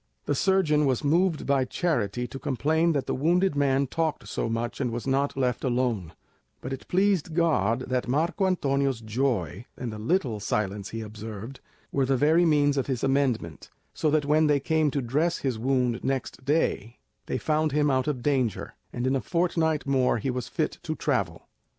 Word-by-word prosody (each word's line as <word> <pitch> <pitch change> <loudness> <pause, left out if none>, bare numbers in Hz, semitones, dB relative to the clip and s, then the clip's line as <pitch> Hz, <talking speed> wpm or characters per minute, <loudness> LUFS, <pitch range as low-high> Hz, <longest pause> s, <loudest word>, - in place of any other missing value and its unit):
The - - 0
surgeon 150 -3 +2
was 130 -3 0
moved 165 +2 +2
by 140 -1 +2
charity 125 - -1
to 135 - -7
complain 160 +6 +1
that 140 -3 -1
the - - -2
wounded 175 +6 +2
man 140 -1 +2
talked 160 +3 -2
so - - -2
much 115 +3 -3
and 125 - 0
was 120 0 -4
not 135 +1 0
left 125 -2 0
alone; 120 -9 -1 0.5
but 130 - -5
it 135 - -8
pleased 185 -4 +1
God 130 - +2
that 125 -1 -2
Marco 165 +9 +1
Antonio's 140 -7 0
joy, 110 - -2
and 120 -3 -4
the 105 - -7
little 120 - 0
silence 100 -1 -2
he 115 - -5
observed, 110 +3 -8 0.3
were 135 -2 +1
the 135 -1 +2
very 160 +6 +4
means 145 -3 +3
of 135 - 0
his 130 -4 -2
amendment, 130 - 0 0.2
so 155 - 0
that 150 -1 +2
when 155 +2 +3
they 145 -1 +3
came 155 +1 +1
to 140 -1 -2
dress 155 +8 +1
his 130 -5 -2
wound 125 -1 0
next 130 -1 -3
day, 130 -5 0 0.3
they - - -1
found 155 0 0
him 150 0 +2
out 130 +1 +1
of 130 -5 -2
danger, 130 -7 0 0.2
and 120 - -3
in 130 +1 +2
a 135 - 0
fortnight 165 -3 0
more 130 -3 +2
he 130 +4 -2
was 125 -1 -4
fit - - -2
to - - -3
travel. - - -2
135 Hz, 185 wpm, -26 LUFS, 120-155 Hz, 0.5 s, very